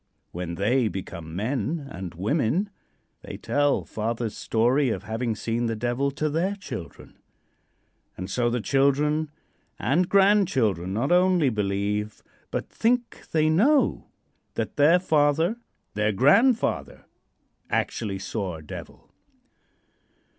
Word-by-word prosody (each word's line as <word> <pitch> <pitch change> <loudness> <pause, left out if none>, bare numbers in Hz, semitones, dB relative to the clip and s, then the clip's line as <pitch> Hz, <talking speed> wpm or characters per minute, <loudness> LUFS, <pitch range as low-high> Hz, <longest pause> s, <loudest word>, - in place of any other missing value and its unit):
When 85 -1 -5
they 115 +6 +2
become 85 -5 -6
men 135 - -2
and 90 -3 -7
women 145 - 0 0.5
they - - -8
tell 145 0 +1
father's 115 0 -3
story 125 +5 +2
of - - -3
having 115 0 -2
seen 115 +3 -2
the 115 - -1
Devil 120 +5 0
to 150 +2 -2
their 170 +7 0
children, 140 - -9 1.0
and 95 - -5
so 120 +4 0
the 120 0 -1
children 145 +4 +2 0.5
and 170 +7 +1
grandchildren 135 - +3
not 120 - -1
only 180 -4 +4
believe, 105 0 -2 0.3
but - - -3
think 240 +1 -1
they 155 -1 +3
know, 245 - +3 0.5
that - - -3
their 150 +4 +5
father 160 +3 +2 0.4
their 105 +1 +1
grandfather 220 - +2 0.6
actually 100 -4 -1
saw 95 -1 -4
a 80 - -10
devil. 75 - -10
125 Hz, 120 wpm, -25 LUFS, 105-155 Hz, 1.0 s, their